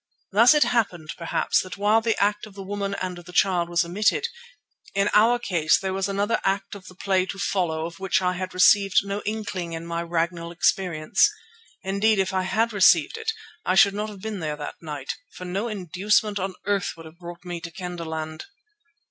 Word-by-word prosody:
Thus 230 +8 +6
it 300 - +6
happened, 215 -10 -1
perhaps, 170 - 0
that 185 -2 -8
while 210 +2 +3
the 225 -1 0
act 210 +1 +1
of 200 - -16
the 195 - -7
woman 200 0 -3
and 185 -2 -4
the 175 +1 -12
child 180 -2 +2
was 175 0 +2
omitted, 195 +6 +1 0.7
in 200 +1 +2
our 225 +3 +5
case 170 -9 +2
there 190 -1 -3
was 195 +1 -1
another 200 +3 0
act 195 0 -1
of 195 -2 -10
the 185 - -12
play 185 0 +1
to 195 - -6
follow 175 -5 -1
of 170 +2 -8
which 190 -1 +1
I 180 -1 0
had 185 +1 -4
received 195 +1 +5
no 200 +1 -3
inkling 200 -6 -3
in 165 0 -5
my 170 0 -3
Ragnall 170 0 -2
experience. 170 -2 +2 0.5
Indeed, 200 +3 +2
if 190 -1 0
I 190 - +1
had 220 +5 0
received 205 - +5
it, 450 0 -2 0.3
I 185 - +1
should 200 +1 +6
not 210 +1 -3
have 200 -3 -11
been 220 -2 -4
there 155 -2 -3
that 150 -1 -8
night, 150 -4 -5 0.2
for 180 - -8
no 195 +6 -2
inducement 205 +1 0
on 190 0 -3
earth 200 -1 0
would 165 - -11
have 160 +2 -14
brought 175 0 -10
me 175 -1 -5
to 165 - -6
Kendahland. 160 -3 -6
190 Hz, 200 wpm, -24 LUFS, 170-205 Hz, 0.7 s, Thus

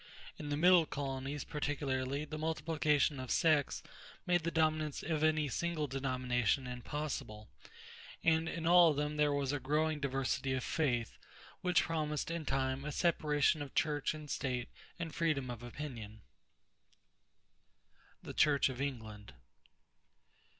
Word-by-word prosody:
In 150 - -5
the 145 - 0
Middle 175 0 +6
colonies, 135 0 -4
particularly, 140 -1 -2
the 155 0 -6
multiplication 155 -2 +1
of 130 -1 -6
sects 155 -4 +2 0.4
made 175 -1 +3
the 165 - -1
dominance 155 -2 0
of 155 -1 -1
any 155 -1 +3
single 165 +2 -1
denomination 130 -2 0
impossible; 125 -4 -5 0.7
and 160 0 +3
in 165 -1 -4
all 175 0 +7
of 150 - 0
them 150 +1 -1
there 150 -1 +3
was 140 -1 0
a 145 - -1
growing 150 +3 0
diversity 135 -1 -1
of 130 - -1
faith, 120 -7 -1 0.4
which 180 -1 +3
promised 155 -1 -2
in 165 -2 -3
time 135 0 0
a 150 - -3
separation 150 -3 +2
of 140 -2 -7
church 150 -1 +1
and 150 -2 -8
state 125 -3 -2 0.3
and 170 -2 -5
freedom 150 -6 0
of 120 -1 -7
opinion. 120 -4 -7 2.0
=The - - -7
Church 145 -2 +4
of 130 0 -5
England. 110 -7 -5
145 Hz, 135 wpm, -34 LUFS, 130-155 Hz, 2.0 s, all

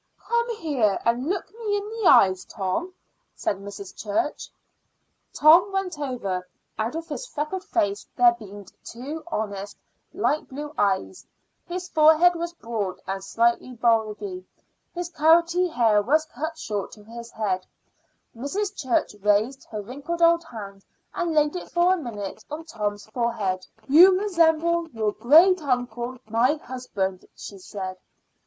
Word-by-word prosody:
"Come 470 0 -1
here 265 - 0
and 240 +5 +1
look 380 -1 -3
me 420 -3 0
in 405 0 -5
the 440 -3 -1
eyes, 185 -1 +5
Tom," 210 - -3 0.4
said 200 - -1
Mrs. 200 0 -9
Church. 210 +7 -2 0.8
Tom 335 +6 +6
went 380 -5 -2
over. 200 -10 -3 0.3
Out 225 +6 -1
of 330 0 -5
his 415 +12 -5
freckled 315 +3 -4
face 200 - -1
there 240 -1 +6
beamed 205 -3 -12
two 285 +7 -7
honest 205 - -4 0.3
light 305 - -1
blue 295 +3 -7
eyes. 200 - -1 0.4
His 360 +1 -5
forehead 320 +2 +5
was 340 0 -4
broad 215 - -4
and 195 0 -4
slightly 235 +4 +1
bulgy; 215 -5 0 0.5
his 350 0 -3
carroty 335 +3 +4
hair 230 -10 +3
was 310 +8 +2
cut 315 +4 -5
short 205 -9 -4
to 210 - -14
his 235 +2 -10
head. 195 -5 -2 0.7
Mrs. 390 - -3
Church 260 - 0
raised 210 +6 +1
her 210 -2 -6
wrinkled 285 +9 -4
old 335 0 +5
hand 200 -7 -9 0.3
and 335 -2 -2
laid 300 +2 +3
it 360 - -6
for 350 +1 +3
a - - 0
minute 210 - -6
on 310 +2 -6
Tom's 210 -7 -4
forehead. 215 -5 -2 0.2
"You 365 +6 +7
resemble 340 -3 +2
your 220 -5 -1
great 330 - +5
uncle, 245 -2 -2
my 230 +6 +2
husband," 210 -10 -4
she 200 - -9
said. 185 0 -6
255 Hz, 145 wpm, -25 LUFS, 210-335 Hz, 0.8 s, You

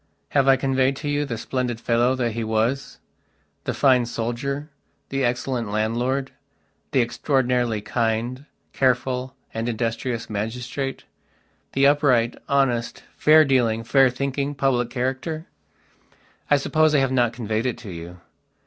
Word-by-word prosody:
Have 140 -2 +2
I 135 - +7
conveyed 135 0 +1
to 145 - -6
you 145 0 0
the 120 -5 -4
splendid 125 0 -2
fellow 120 +2 +2
that 120 -3 -1
he 115 +1 -3
wasthe 110 +5 -1 0.7
fine 130 -3 +3
soldier, 130 +6 -3 0.4
the 135 0 -1
excellent 120 -2 -1
landlord, 120 +6 -1 0.6
the 130 - +3
extraordinarily 125 -3 0
kind, 115 +5 -2 0.3
careful 130 0 0 0.2
and 115 +1 -2
industrious 115 +1 -2
magistrate, 125 +6 -4 0.7
the 135 +1 +3
upright, 130 -5 +3
honest, 125 -4 +1
fair 155 +1 +6
dealing, 120 -5 +2
fair 130 +3 +4
thinking, 140 +3 -2
public 125 -3 +1
character? 130 +6 -3 1.0
I 145 - +5
suppose 155 +2 +2
I - - +5
have 135 -1 +1
not 120 -3 +2
conveyed 115 0 -2
it 125 - -2
to 105 - -9
you. 85 +1 -9
125 Hz, 130 wpm, -23 LUFS, 115-135 Hz, 1.0 s, I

